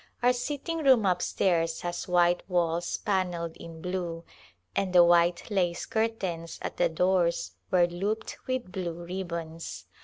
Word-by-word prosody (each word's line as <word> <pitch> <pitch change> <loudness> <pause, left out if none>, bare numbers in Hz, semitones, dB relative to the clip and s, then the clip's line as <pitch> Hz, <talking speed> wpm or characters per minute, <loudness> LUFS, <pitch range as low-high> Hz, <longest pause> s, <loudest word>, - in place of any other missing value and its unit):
Our 250 +1 +5
sitting 290 +6 -3
room 260 -8 +5
up 180 -2 +2
stairs 165 -3 +1
has 175 0 -4
white 175 -1 +3
walls 170 -1 0
pannelled 180 -4 -1
in 165 -1 -10
blue, 175 -2 -3 0.5
and 190 -2 0
the 175 -1 +8
white 170 +3 +3
lace 180 -4 0
cur 220 0 +1
tains 175 -7 -5
at - - -4
the 175 -1 +3
doors 175 +1 +1 0.2
were 180 -2 +5
looped 195 +6 -3
with 255 -7 -2
blue 180 -2 -3
ribbons. 170 -3 -5
175 Hz, 150 wpm, -28 LUFS, 170-195 Hz, 0.5 s, the